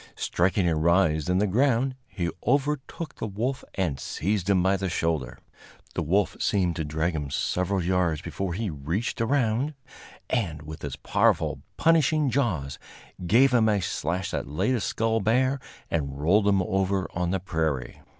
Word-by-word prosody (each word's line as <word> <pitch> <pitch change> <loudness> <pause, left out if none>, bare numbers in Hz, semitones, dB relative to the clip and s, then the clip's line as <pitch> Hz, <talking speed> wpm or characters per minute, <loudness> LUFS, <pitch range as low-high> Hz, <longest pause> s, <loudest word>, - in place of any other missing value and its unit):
Striking 90 +1 +1
a 85 - +2
rise 80 -1 +2
in 90 - +3
the 105 - +3
ground, 130 +5 +2
he 85 -3 -3 0.2
overtook 145 +3 0
the - - -3
wolf 120 +7 -2
and 80 -9 -1
seized 100 +6 -2
him 95 -3 +4
by 95 +1 +3
the 95 -1 -2
shoulder. 80 -5 -1 0.6
The - - -1
wolf 95 +6 +1
seemed 90 -5 +1
to 80 - -1
drag 80 +3 -1
him 75 -3 -3
several 90 +6 0
yards 90 -3 +1
before 95 -3 -3
he 105 -1 -2
reached 80 +12 -3
around, 130 +3 +1 0.5
and 85 - -1
with 75 +1 -9
his 70 -2 -4
powerful, 70 - +1 0.2
punishing 155 -3 +3
jaws 95 - -1 0.5
gave 125 +7 +5
him 110 -3 +4
a 105 -1 +2
slash 90 0 -2
that - - -3
laid 75 - 0
his 115 -5 0
skull 115 0 0
bare 130 +6 +2 0.3
and 70 -4 -2
rolled 100 +7 +3
him 100 -2 +3
over 95 +1 0
on 85 0 -1
the 95 +1 0
prairie. 80 -8 -2
95 Hz, 165 wpm, -26 LUFS, 80-115 Hz, 0.6 s, gave